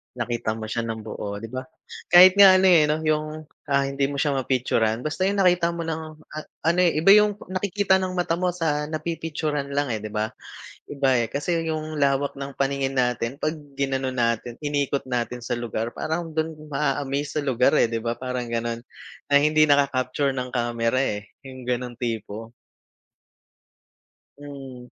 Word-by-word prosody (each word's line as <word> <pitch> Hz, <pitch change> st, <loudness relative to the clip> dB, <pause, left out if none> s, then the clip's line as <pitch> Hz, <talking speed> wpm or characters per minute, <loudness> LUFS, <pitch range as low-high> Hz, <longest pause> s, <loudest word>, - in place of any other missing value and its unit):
Nakita 120 Hz, -2 st, -2 dB
mo 110 Hz, -1 st, -6 dB
siya 115 Hz, +1 st, -2 dB
ng 110 Hz, -1 st, -4 dB
buo 105 Hz, -1 st, -6 dB
di 115 Hz, -, -7 dB
ba? 130 Hz, +2 st, -5 dB, 0.4 s
Kahit 185 Hz, +2 st, +8 dB
nga 195 Hz, -2 st, +9 dB
ano, 190 Hz, -, +3 dB
eh, 165 Hz, -4 st, +6 dB, 0.2 s
yung, 155 Hz, 0 st, -2 dB, 0.2 s
ah, 140 Hz, -1 st, +2 dB
hindi 140 Hz, 0 st, 0 dB
mo 140 Hz, 0 st, -2 dB
siya 145 Hz, -3 st, +1 dB
ma-picturan 120 Hz, -3 st, 0 dB
basta 155 Hz, +6 st, -1 dB
yung 200 Hz, +1 st, +1 dB
nakita 175 Hz, -2 st, +3 dB
mo 170 Hz, -, -4 dB
ng 160 Hz, -1 st, -3 dB, 0.6 s
ano, 170 Hz, +2 st, +3 dB
eh, 175 Hz, -2 st, +3 dB
iba 195 Hz, -, +4 dB
yung 210 Hz, 0 st, +4 dB, 0.2 s
nakikita 190 Hz, +1 st, +1 dB
ng 185 Hz, -1 st, -3 dB
mata 175 Hz, -2 st, 0 dB
mo 180 Hz, -1 st, 0 dB
sa 150 Hz, -4 st, -1 dB
na 155 Hz, 0 st, -4 dB
pi-picturan 155 Hz, -3 st, -3 dB
lang, 145 Hz, -1 st, 0 dB
eh, 110 Hz, -, -1 dB
di 105 Hz, 0 st, -8 dB
ba? 110 Hz, +1 st, -1 dB, 0.6 s
Iba 135 Hz, -2 st, +1 dB
eh. 115 Hz, -, -6 dB
Kasi 165 Hz, +3 st, -1 dB
yung 155 Hz, -1 st, -3 dB
lawak 140 Hz, -1 st, +1 dB
ng 140 Hz, 0 st, -6 dB
paningin 135 Hz, 0 st, 0 dB
natin 125 Hz, +2 st, -1 dB
pag 155 Hz, +1 st, -1 dB, 0.2 s
inano 135 Hz, -1 st, -1 dB
natin 120 Hz, -1 st, -1 dB
inikot 145 Hz, -2 st, -1 dB
natin 125 Hz, 0 st, -2 dB
sa 120 Hz, 0 st, -3 dB
lugar 115 Hz, -1 st, -4 dB
parang 165 Hz, +2 st, -2 dB
dun 160 Hz, 0 st, 0 dB, 0.2 s
maa-amaze 145 Hz, +1 st, -1 dB
sa -, -, -7 dB
lugar, 130 Hz, -2 st, +2 dB
eh, -, -, +4 dB
di 115 Hz, -, -3 dB
ba? 115 Hz, +1 st, -2 dB
Parang 125 Hz, -1 st, -4 dB
ganon. 115 Hz, 0 st, -3 dB, 0.5 s
Ang 140 Hz, -, +7 dB
hindi 155 Hz, 0 st, +5 dB
naka 145 Hz, -2 st, +4 dB
capture 135 Hz, +1 st, -1 dB
ng 125 Hz, -1 st, -4 dB
kamera, 120 Hz, 0 st, 0 dB
eh, 105 Hz, -6 st, -3 dB
yung 130 Hz, -1 st, -11 dB
ganong 125 Hz, -1 st, -3 dB
tipo. 115 Hz, -1 st, -5 dB, 1.9 s
Hmm. 135 Hz, -3 st, -9 dB
140 Hz, 175 wpm, -24 LUFS, 120-155 Hz, 1.9 s, nga